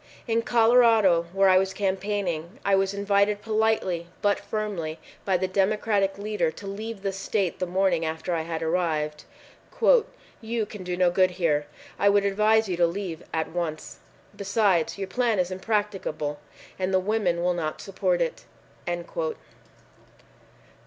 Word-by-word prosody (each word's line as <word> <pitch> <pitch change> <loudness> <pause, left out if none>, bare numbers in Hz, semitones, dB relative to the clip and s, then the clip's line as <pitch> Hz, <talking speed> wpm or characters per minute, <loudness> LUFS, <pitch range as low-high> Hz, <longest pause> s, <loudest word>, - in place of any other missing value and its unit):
In 230 0 +2
Colorado, 225 -7 +4
where 195 +1 +3
I 185 0 +6
was 190 0 -2
cam 195 -2 +1
paigning, 190 -2 -3
I 200 - +2
was 195 0 +3
invited 200 +1 +1
politely 215 -6 0 0.2
but 205 -1 +2
firmly 195 -7 -4 0.3
by 190 -2 +2
the 185 +1 -1
Democratic 195 +1 +1
leader 205 -5 -1
to 200 - -10
leave 205 +1 -6
the 195 - 0
state 195 -1 -2
the 185 - -1
morning 180 -2 +1
after 160 +2 -3
I 165 - 0
had 165 0 -4
arrived. 155 -3 -1 1.2
"You 225 -1 -2
can 205 -2 -9
do 180 0 -3
no 180 -1 +3
good 185 +1 +4
here. 150 -5 +1 0.3
I 200 - +5
would 200 0 +3
advise 215 +2 +3
you 180 -2 -2
to 170 -1 +4
leave 175 -2 -5
at 160 -1 -2
once. 165 -2 -4 0.4
Besides, 195 -4 +1
your 195 -1 -4
plan 235 0 +1
is 180 0 0
impracticable 190 -7 -2 0.4
and 185 0 -1
the 190 - +3
women 185 -4 0
will 180 0 +2
not 160 -3 -3
support - - -1
it." - - -5
195 Hz, 150 wpm, -26 LUFS, 175-210 Hz, 1.2 s, I